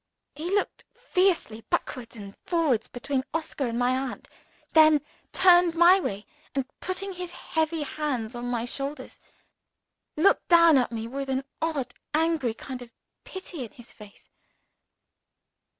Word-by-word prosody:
He 315 +5 -5
looked 405 +1 -1
fiercely 370 - +1
backwards 245 -3 -2
and 200 -2 -9
forwards 310 -10 +1
between 260 +2 -2
Oscar 310 -4 -2
and 230 0 -3
my 250 +1 +2
aunt 260 -1 -4 0.4
then 310 -2 +6 0.3
turned 355 -2 +5
my 345 +3 +7
way, 205 - -4 0.3
and 270 -2 0
putting 380 +1 -4
his 360 -1 -5
heavy 320 -2 -2
hands 270 -7 -3
on 240 0 -5
my 240 -1 -1
shoulders, 275 +2 -5 1.0
looked 355 +6 +3
down 335 -4 +7
at 245 - 0
me 225 -1 -4
with 270 +2 -5
an 265 0 0 0.2
odd 315 -5 -2 0.2
angry 310 -7 +1
kind 255 +1 -7
of 245 - -10 0.4
pity 370 -6 -7
in 230 - -10
his 240 -1 -15
face. 210 -2 -15
285 Hz, 140 wpm, -26 LUFS, 245-335 Hz, 1.0 s, my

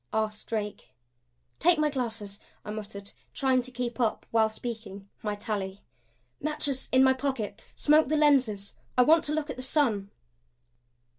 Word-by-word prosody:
asked 215 -1 -1
Drake. 210 -2 -4 0.7
"Take 345 0 +5
my 305 -1 +2
glasses," 225 -6 -3 0.3
I 210 - -4
muttered, 205 -2 -7 0.2
trying 260 -1 +3
to 250 - -8
keep 245 -1 -4
up, 230 -3 0
while 220 -1 +4
speaking, 220 -3 -6
my 210 -1 -2
tally. 205 -2 -4 0.6
"Matches 285 -3 -1
in 260 0 +6
my 265 0 +6
pocket. 260 -6 -3
Smoke 305 0 +4
the 310 +2 +1
lenses. 255 -10 +3 0.2
I 250 - +7
want 315 +4 +5
to 295 - +1
look 305 -1 -1
at 255 -1 -6
sun." 235 -9 +1
240 Hz, 150 wpm, -28 LUFS, 210-275 Hz, 0.7 s, I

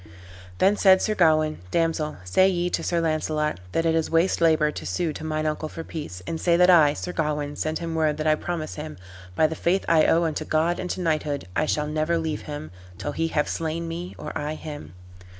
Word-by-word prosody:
Then 200 - +3
said 190 -1 +6
Sir 215 - 0
Gawain, 155 -4 +3
"Damsel, 165 - 0
say 185 - +4
ye 180 -1 -1
to - - 0
Sir 170 - 0
Launcelot, 155 - -1
that 165 - 0
it 165 - +3
is 160 -1 0
waste 165 +2 +2
labor 155 -2 +4
to - - -7
sue 170 -4 -1
to - - -8
mine 155 0 -2
uncle 155 0 -2
for 165 - -7
peace, 150 - -7
and 160 - -4
say 170 -1 +3
that 180 +1 +6
I, 155 -5 +6
Sir 180 - -4
Gawain, 150 -2 -2
send 155 0 -2
him 165 -1 -4
word 155 -2 +1
that 155 - -3
I 155 - +5
promise 155 0 -4
him, 155 -5 -7 0.4
by 160 - +4
the 155 - 0
faith 175 +4 0
I 160 -2 +4
owe 170 +1 +3
unto 155 -1 -1
God 160 +3 +1
and 180 - -4
to 185 - -3
knighthood, 155 - -1
I 155 - +1
shall 150 0 0
never 155 +2 0
leave 160 -2 -2
him 145 - -6 0.3
till 145 - -4
he 165 +3 -1
have 150 -2 0
slain 165 +1 -3
me 170 +2 -6
or - - -7
I 150 0 -3
him." 145 - -8
160 Hz, 225 wpm, -25 LUFS, 155-170 Hz, 0.4 s, said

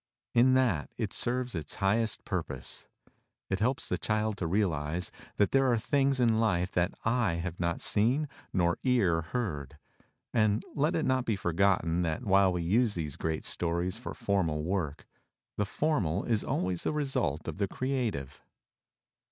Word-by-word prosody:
In 130 +2 +5
that 105 - +2
it - - -2
serves 125 0 0
its 80 -5 -4
highest 105 +3 +1
purpose. - - -4 0.6
It 95 - +1
helps 125 +5 +1
the 90 - -1
child 110 0 0
to 90 - -2
realize 85 -3 0 0.3
that 105 - +3
there 135 -1 +4
are 120 - +3
things 135 +4 +1
in 115 -3 +3
life 90 -5 +1
that 90 0 0
eye 115 -5 +2
have 85 0 -4
not 85 -1 -1
seen 125 +9 +2 0.2
nor 85 -2 +1
ear 100 -11 +2
heard, 80 - -4 0.6
and 110 -2 +2
let 150 +3 +1
it 160 - +1
not 130 -1 +1
be 110 - +1
forgotten 90 -2 +1
that 85 +7 -1
while 95 -1 +5
we 90 -1 -2
use 105 +5 +2
these 75 -5 -3
great 80 -1 -3
stories 90 +4 -1
for 125 - -6
formal 95 -10 0
work, 80 -4 -2 0.5
the 105 - 0
formal 100 - 0
is 110 -4 0
always 90 -1 -1
the - - -1
result 135 - -1
of - - -5
the 100 - +1
creative. 120 - -2
100 Hz, 160 wpm, -30 LUFS, 85-120 Hz, 0.6 s, In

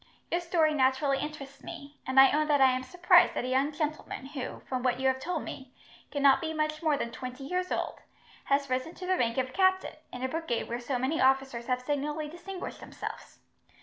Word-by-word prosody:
Your 345 - +1
story 330 -3 +2
naturally 270 0 +2
interests 280 -2 -7
me, 285 0 -9
and 260 +1 +4
I 270 0 +9
own 305 +1 +2
that 295 -2 +3
I 265 -1 +6
am 255 0 -1
surprised 350 +7 +4
that - - -1
a - - -2
young 270 +3 +2
gentleman 305 -3 -4
who, 270 -1 -6
from 255 -1 -3
what 250 0 +1
you 265 - +2
have 260 0 +2
told 355 +6 -3
me, 260 -1 -9 0.3
cannot 280 0 +4
be 320 -1 -3
much 305 0 -1
more 310 -3 +2
than 235 - -3
twenty 255 +3 -7
years 360 +5 -2
old, - - -2 0.5
has 280 0 +2
risen 255 +6 -2
to 370 - -7
the 370 0 +2
rank 230 -6 0
of 260 0 -1
captain, 375 0 +2 0.2
in 250 0 -6
a - - +1
brigade 315 -4 -2
where 235 +1 -3
so 250 +1 -2
many 265 +6 0
officers 265 -3 +2
have 250 0 0
signally 295 +2 -2
distinguished 360 +4 -7
themselves. - - -8
275 Hz, 215 wpm, -29 LUFS, 260-310 Hz, 0.5 s, I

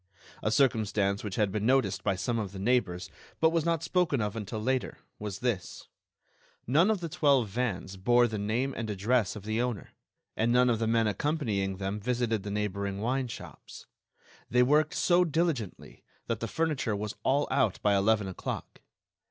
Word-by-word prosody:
A - - 0
circumstance 105 -4 +1
which 105 -3 -4
had 105 -2 +1
been 105 +2 -1
noticed 135 0 +2
by 100 -2 +1
some 115 +5 -1
of 100 -3 -4
the - - -7
neighbors, 95 -5 0 0.3
but 160 0 +4
was 165 -1 +1
not 165 -1 0
spoken 165 -5 +1
of 105 -1 -2
until 110 0 -4
later, 130 +4 -1 0.2
was 105 -2 -5
this: 115 -7 -3 0.8
None 155 - +4
of 215 -4 +1
the 170 - -3
twelve 140 -7 +2
vans 100 -4 -3
bore 120 +5 +4
the 110 -3 -3
name 120 +7 -1
and 115 -1 -4
address 105 0 +1
of 105 - -8
the 110 +2 -1
owner, 120 -6 -3 0.4
and 115 +2 +1
none 125 0 +4
of 115 - 0
the 115 - 0
men 115 0 +3
accompanying 105 -6 -1
them 100 +2 -3
visited 120 -1 0
the 100 - -6
neighboring 100 -1 -2
wine 125 +4 0
shops. 115 - -10 0.6
They 125 +1 +4
worked 150 +4 +3
so 180 0 +4
diligently 160 - -2 0.2
that 115 -2 -2
the 115 - -3
furniture 150 -6 -1
was 105 0 -4
all 140 +2 +2
out 130 -8 +2
by 105 -1 +4
eleven 100 +1 +2
o'clock. 95 - -6
115 Hz, 180 wpm, -29 LUFS, 100-130 Hz, 0.8 s, but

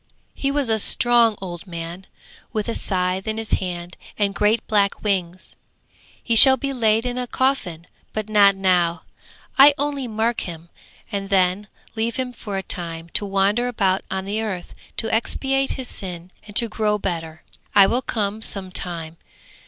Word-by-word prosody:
He 275 - -2
was 280 -2 0
a 220 -1 +1
strong 235 0 +3
old 175 0 -8
man, 170 +2 -7 0.4
with 215 -1 -3
a 230 - -2
scythe 185 0 -1
in 220 0 -2
his 225 -1 -3
hand 175 -1 -3 0.2
and 200 -1 0
great 210 +3 +1
black 200 -2 +1
wings. 185 -3 -2 0.7
'He 230 - 0
shall 265 +3 +10
be 275 +2 -3
laid 225 -2 +2
in 245 0 -2
a 250 - -4
coffin, 215 -12 -1 0.3
but 215 -1 -4
not 205 -2 +5
now; 175 -3 +1 0.6
I 285 +1 +8
only 285 -2 -2
mark 225 +1 -1
him 170 -1 -7 0.4
and 200 -1 -4
then 190 +1 +1 0.3
leave 225 +1 -1
him 255 -1 -3
for 205 -4 -4
a 190 - -3
time 170 -2 -4
to 205 - 0
wander 200 +5 +1
about 195 -6 0
on 190 0 -3
the 210 +3 -2
earth 195 -5 -5 0.2
to 225 - -2
expiate 270 +4 0
his 260 -2 -3
sin 180 -4 -4 0.2
and 205 - -12
to 235 - +6
grow 215 -1 -1
better. 165 -5 -5 0.3
I 200 - +8
will 240 +6 0
come 215 -3 -2
some 195 -4 -2
time. 170 -3 -4
205 Hz, 170 wpm, -21 LUFS, 180-230 Hz, 0.7 s, shall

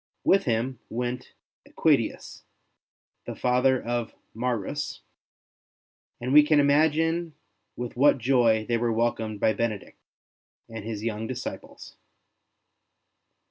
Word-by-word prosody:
With 195 -1 +3
him 120 +1 -1
went 125 +2 -4 0.4
^Equitius, - - 0 0.9
the - - -5
father 125 +1 +2
of 120 -1 -3 0.2
Maurus, 125 +4 -3 1.2
and 125 +2 -2
we 150 - +10
can 150 0 +3
imagine 160 +3 +2 0.4
with 120 -1 -6
what 140 +3 +4
joy 120 -3 +2
they 120 +1 0
were 120 0 0
welcomed 110 -2 -1
by 110 - +2
Benedict 110 -2 -4 0.7
and 115 -2 -8
his 110 -1 -5
3^oung 110 -1 -3
disciples. 125 0 -8
120 Hz, 105 wpm, -26 LUFS, 115-140 Hz, 1.2 s, we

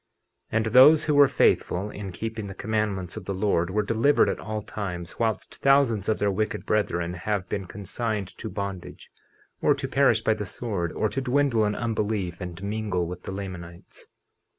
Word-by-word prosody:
50:22 - - +1
And 115 - +1
those 145 +5 +8
who 150 - +1
were 145 -1 +7
faithful 100 -5 +1
in 100 -2 -6
keeping 110 +2 -5
the 95 - -8
commandments 105 -4 -2
of 105 - -7
the 100 - -3
Lord 95 -3 +1
were 105 +3 0
delivered 115 +7 +3
at - - -2
all 105 0 -4
times, 90 -5 -6
whilst 110 -4 -1
thousands 135 -8 +3
of 110 - +2
their 100 0 +1
wicked 110 +3 -2
brethren 90 -5 0
have 90 +2 -2
been 100 +1 -3
consigned 100 +1 -4
to 110 - -5
bondage, 100 -2 -6 0.5
or - - +4
to - - -4
perish 125 -5 +3
by 110 - +3
the 105 -2 -5
sword, 95 -5 -3
or 110 - 0
to 135 - -2
dwindle 130 -4 +2
in 105 0 0
unbelief, 105 -6 -2
and 90 +1 -7
mingle 100 -4 -1
with 90 +1 -6
the - - -7
Lamanites. 90 -3 -8
105 Hz, 185 wpm, -26 LUFS, 95-110 Hz, 0.5 s, those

